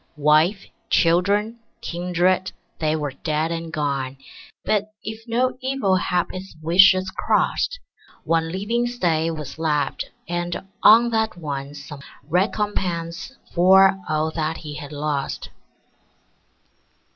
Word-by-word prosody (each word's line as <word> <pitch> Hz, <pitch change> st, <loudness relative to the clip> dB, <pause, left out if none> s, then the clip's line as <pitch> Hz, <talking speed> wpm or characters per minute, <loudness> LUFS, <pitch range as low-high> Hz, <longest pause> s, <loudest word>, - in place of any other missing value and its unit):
Wife, 155 Hz, +7 st, +3 dB, 0.2 s
children, 200 Hz, +7 st, +2 dB, 0.2 s
kindred, 180 Hz, +2 st, 0 dB, 0.3 s
they 155 Hz, -1 st, +1 dB
were 150 Hz, -3 st, -2 dB
dead 155 Hz, +3 st, -2 dB
and 165 Hz, -1 st, -4 dB
gone; 140 Hz, -3 st, -2 dB, 0.5 s
But, 210 Hz, 0 st, 0 dB
if 220 Hz, +1 st, -6 dB
no 250 Hz, +2 st, 0 dB
evil 260 Hz, -7 st, +1 dB
hap 180 Hz, -1 st, 0 dB
his 185 Hz, -2 st, -8 dB
wishes 185 Hz, +3 st, +5 dB
crossed, -, -, +1 dB, 0.5 s
One 165 Hz, 0 st, 0 dB
living 225 Hz, +6 st, -1 dB
Stay 170 Hz, -9 st, 0 dB
was 155 Hz, -1 st, -6 dB
left, 150 Hz, -2 st, -1 dB, 0.2 s
and 175 Hz, +1 st, -3 dB, 0.2 s
on 235 Hz, +2 st, +7 dB
that 220 Hz, -4 st, 0 dB
one 145 Hz, -3 st, -5 dB
Some 145 Hz, 0 st, -9 dB, 0.3 s
recompence 180 Hz, +2 st, -2 dB, 0.2 s
for 190 Hz, +2 st, +5 dB
all 155 Hz, +1 st, 0 dB
that 160 Hz, 0 st, -2 dB
he 150 Hz, -2 st, -8 dB
had 145 Hz, -2 st, -8 dB
lost. 145 Hz, -1 st, -3 dB
175 Hz, 115 wpm, -22 LUFS, 155-195 Hz, 0.5 s, on